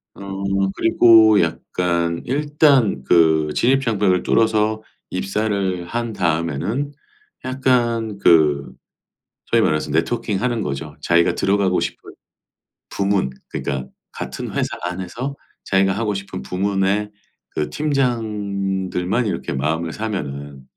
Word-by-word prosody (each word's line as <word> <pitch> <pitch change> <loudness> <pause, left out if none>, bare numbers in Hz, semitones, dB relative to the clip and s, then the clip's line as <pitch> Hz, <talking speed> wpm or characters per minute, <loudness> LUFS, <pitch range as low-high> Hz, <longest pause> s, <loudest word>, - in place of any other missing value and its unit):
어. - - -12 0.5
그리고 110 -2 +6
약간 85 0 -1
일단 140 - +2
그 80 -2 +4
진입 135 +3 +3
장벽을 105 -7 +1
뚫어서 110 -1 +2 0.3
입사를 95 -2 -1
한 115 +4 -3
다음에는 85 - -1 0.5
약간 120 -4 0
그 75 -7 +3 0.7
소위 - - +2
말해서 75 -1 0
네트워킹하는 110 +7 0
거죠. 75 +2 -4
자기가 85 +2 +3
들어가고 100 -2 +2
싶은 - - -5 0.8
부문 100 -7 0 0.2
그러니까 65 -2 -4 0.2
같은 - - -6
회사 - - 0 0.2
안에서 95 +10 -4 0.3
자기가 95 0 +2
하고 105 +1 -1
싶은 100 -8 -6
부문의 95 +6 0 0.4
그 75 - -3
팀장들만 105 -7 -1
이렇게 100 - -3
마음을 80 +5 -1
사면은 70 -10 -5
100 Hz, 250 characters per minute, -20 LUFS, 85-115 Hz, 0.8 s, 그리고